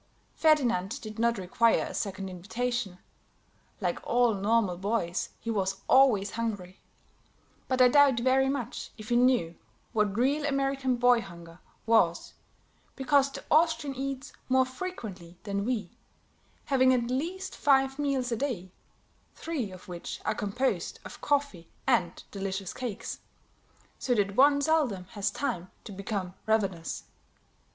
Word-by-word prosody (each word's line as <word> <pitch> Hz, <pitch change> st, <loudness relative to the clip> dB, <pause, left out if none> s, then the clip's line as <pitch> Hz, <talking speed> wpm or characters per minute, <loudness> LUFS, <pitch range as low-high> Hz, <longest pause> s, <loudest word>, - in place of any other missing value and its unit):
Ferdinand 240 Hz, -, +2 dB
did 215 Hz, -1 st, -8 dB
not 235 Hz, 0 st, +2 dB
require 210 Hz, +5 st, +2 dB
a -, -, -7 dB
second 195 Hz, -1 st, -3 dB
invitation; 205 Hz, +2 st, -3 dB, 0.8 s
like -, -, -1 dB
all 240 Hz, -1 st, +3 dB
normal 205 Hz, -1 st, +1 dB
boys, 185 Hz, -2 st, -1 dB
he 230 Hz, -, -3 dB
was 195 Hz, -2 st, -1 dB
always 230 Hz, -7 st, +5 dB
hungry; 205 Hz, -5 st, -4 dB, 0.9 s
but 260 Hz, -1 st, +4 dB
I -, -, +8 dB
doubt 275 Hz, -1 st, +5 dB
very 260 Hz, +2 st, +3 dB
much 270 Hz, -5 st, -4 dB
if 215 Hz, 0 st, -10 dB
he 240 Hz, -, +2 dB
knew 245 Hz, -9 st, +3 dB, 0.4 s
what 210 Hz, -2 st, +1 dB
real 280 Hz, +5 st, +2 dB
American 275 Hz, -2 st, 0 dB
boy 245 Hz, 0 st, +4 dB
hunger 170 Hz, -3 st, -12 dB, 0.3 s
was, 200 Hz, -7 st, +2 dB, 0.6 s
because 275 Hz, +1 st, +3 dB
the -, -, -8 dB
Austrian 310 Hz, -3 st, +3 dB
eats 275 Hz, +1 st, -5 dB, 0.2 s
more 260 Hz, 0 st, +4 dB
frequently 220 Hz, -, -7 dB
than 200 Hz, -1 st, -2 dB
we, 240 Hz, -3 st, -2 dB, 0.7 s
having 260 Hz, -2 st, +4 dB
at 240 Hz, 0 st, -1 dB
least 355 Hz, +9 st, -3 dB
five 270 Hz, -1 st, +2 dB
meals 270 Hz, -4 st, 0 dB
a -, -, +1 dB
day, 220 Hz, -8 st, -3 dB, 0.6 s
three 290 Hz, -11 st, -3 dB
of 185 Hz, -1 st, -12 dB
which 175 Hz, -1 st, -6 dB
are 215 Hz, -, +1 dB
composed 215 Hz, +6 st, -2 dB
of -, -, -10 dB
coffee 280 Hz, -, -1 dB, 0.2 s
and 190 Hz, -10 st, +1 dB
delicious 195 Hz, -1 st, -4 dB
cakes, 245 Hz, -6 st, -5 dB, 0.8 s
so 245 Hz, -, +1 dB
that 200 Hz, -2 st, 0 dB
one 285 Hz, +2 st, +5 dB
seldom 280 Hz, -, +1 dB
has 205 Hz, -3 st, -1 dB
time 185 Hz, -10 st, -3 dB
to 215 Hz, -, -9 dB
become 195 Hz, -2 st, -4 dB
ravenous. 195 Hz, -7 st, 0 dB
235 Hz, 135 wpm, -29 LUFS, 195-270 Hz, 0.9 s, I